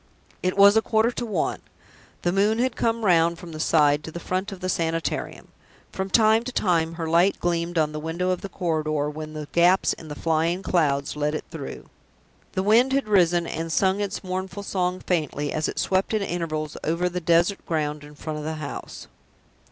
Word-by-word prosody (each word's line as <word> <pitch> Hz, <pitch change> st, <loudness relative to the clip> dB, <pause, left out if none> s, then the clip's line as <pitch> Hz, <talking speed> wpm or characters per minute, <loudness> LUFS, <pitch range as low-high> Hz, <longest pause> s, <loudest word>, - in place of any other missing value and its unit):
It 185 Hz, +1 st, -1 dB
was 200 Hz, +1 st, +7 dB
a 220 Hz, -, +5 dB
quarter 220 Hz, +1 st, +2 dB
to 240 Hz, -1 st, -4 dB
one. 195 Hz, -7 st, -1 dB, 0.6 s
The 175 Hz, -, +2 dB
moon 205 Hz, +4 st, +2 dB
had 250 Hz, 0 st, 0 dB
come 230 Hz, -1 st, 0 dB
round 170 Hz, -2 st, +4 dB
from 170 Hz, 0 st, -10 dB
the 155 Hz, -, -7 dB
side 150 Hz, -2 st, +3 dB
to 160 Hz, -, -7 dB
the 170 Hz, -, -6 dB
front 185 Hz, +4 st, -3 dB
of 195 Hz, -, -8 dB
the 185 Hz, -, -3 dB
Sanitarium. 165 Hz, -2 st, -2 dB, 0.4 s
From 190 Hz, 0 st, -3 dB
time 220 Hz, +2 st, +4 dB
to 255 Hz, -, -5 dB
time 165 Hz, -8 st, +1 dB
her 165 Hz, -1 st, -4 dB
light 170 Hz, +4 st, +3 dB
gleamed 170 Hz, 0 st, -1 dB
on 155 Hz, -1 st, +2 dB
the 150 Hz, -, -5 dB
window 170 Hz, +4 st, -1 dB
of 180 Hz, -, -2 dB
the 200 Hz, -, -6 dB
corridor 155 Hz, -5 st, -1 dB
when 155 Hz, 0 st, -7 dB
the 155 Hz, -1 st, -6 dB
gaps 175 Hz, +2 st, +4 dB
in 160 Hz, -, -11 dB
the 150 Hz, -, -6 dB
flying 165 Hz, +4 st, 0 dB
clouds 145 Hz, -7 st, +1 dB
let 150 Hz, +1 st, -1 dB
it -, -, -5 dB
through. 160 Hz, -5 st, -7 dB, 0.7 s
The 190 Hz, -, -1 dB
wind 235 Hz, +6 st, +4 dB
had 275 Hz, -4 st, +1 dB
risen, 175 Hz, -4 st, +3 dB
and 165 Hz, 0 st, -4 dB
sung 190 Hz, +4 st, +2 dB
its 200 Hz, -1 st, -3 dB
mournful 190 Hz, +1 st, -4 dB
song 185 Hz, -2 st, -1 dB
faintly, 150 Hz, -4 st, -1 dB
as 155 Hz, 0 st, 0 dB
it -, -, -5 dB
swept 190 Hz, +3 st, +1 dB
at 210 Hz, -, 0 dB
intervals 155 Hz, -4 st, -3 dB
over 170 Hz, +3 st, 0 dB
the 180 Hz, 0 st, -3 dB
desert 170 Hz, +4 st, +2 dB
ground 150 Hz, -2 st, -2 dB
in 150 Hz, 0 st, -13 dB
front 155 Hz, +1 st, -5 dB
of -, -, -6 dB
the 160 Hz, 0 st, -3 dB
house. 155 Hz, -2 st, -7 dB
170 Hz, 205 wpm, -24 LUFS, 155-195 Hz, 0.7 s, was